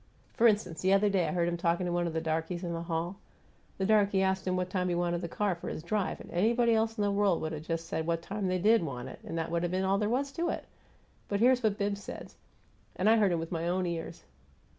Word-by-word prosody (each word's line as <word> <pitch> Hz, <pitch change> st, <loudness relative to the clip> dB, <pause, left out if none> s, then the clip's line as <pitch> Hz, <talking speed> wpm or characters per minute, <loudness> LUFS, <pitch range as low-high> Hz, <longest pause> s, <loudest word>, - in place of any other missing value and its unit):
For 235 Hz, -, +5 dB
instance, 205 Hz, -7 st, +1 dB
the 190 Hz, +1 st, +3 dB
other 200 Hz, +1 st, +4 dB
day 190 Hz, -3 st, +1 dB
I -, -, -1 dB
heard 175 Hz, -2 st, +1 dB
him 175 Hz, 0 st, -1 dB
talkin' 170 Hz, +1 st, +1 dB
to 175 Hz, -, -1 dB
one 175 Hz, 0 st, 0 dB
of 165 Hz, -, -4 dB
the 160 Hz, -, -1 dB
darkies 165 Hz, +2 st, -2 dB
in 170 Hz, -1 st, -3 dB
the 165 Hz, -, -3 dB
hall. 170 Hz, +2 st, -3 dB, 0.6 s
The 190 Hz, -, 0 dB
darky 200 Hz, -2 st, +3 dB
asked 190 Hz, 0 st, 0 dB
him 185 Hz, -, +1 dB
what 180 Hz, 0 st, -2 dB
time 180 Hz, -1 st, 0 dB
he 175 Hz, -, 0 dB
wanted 175 Hz, 0 st, 0 dB
the 170 Hz, -, -3 dB
car 200 Hz, +3 st, 0 dB
for 170 Hz, -, -6 dB
his 155 Hz, -, -5 dB
drive, 195 Hz, +2 st, -1 dB
and -, -, -11 dB
anybody 230 Hz, +6 st, +3 dB
else 225 Hz, +1 st, +1 dB
in 210 Hz, -, +1 dB
the 205 Hz, -, +2 dB
world 200 Hz, -3 st, +2 dB
would 160 Hz, -, -2 dB
have 155 Hz, 0 st, -7 dB
just 165 Hz, 0 st, -2 dB
said 160 Hz, 0 st, -3 dB
what 165 Hz, 0 st, 0 dB
time 200 Hz, +1 st, -3 dB
they 185 Hz, 0 st, +1 dB
DID 215 Hz, +4 st, +4 dB
want 125 Hz, -7 st, -5 dB
it, -, -, -10 dB
and 165 Hz, -, -5 dB
that 165 Hz, 0 st, -2 dB
would 170 Hz, 0 st, 0 dB
have 175 Hz, 0 st, -1 dB
been 185 Hz, +1 st, 0 dB
all 195 Hz, +1 st, +2 dB
there 210 Hz, 0 st, 0 dB
was 275 Hz, +4 st, 0 dB
to 335 Hz, +5 st, -1 dB
it; -, -, -3 dB, 0.6 s
but 200 Hz, -, -1 dB
here's 250 Hz, +2 st, +4 dB
what 215 Hz, -3 st, +1 dB
Bibbs 200 Hz, -1 st, -1 dB
says, -, -, -8 dB, 0.6 s
and 185 Hz, -, 0 dB
I 225 Hz, +1 st, +6 dB
heard 205 Hz, -4 st, +3 dB
him 170 Hz, -, +1 dB
with 165 Hz, 0 st, -5 dB
my 165 Hz, -1 st, -2 dB
own 180 Hz, +1 st, 0 dB
ears. 165 Hz, -, -5 dB
185 Hz, 280 wpm, -30 LUFS, 170-205 Hz, 0.6 s, I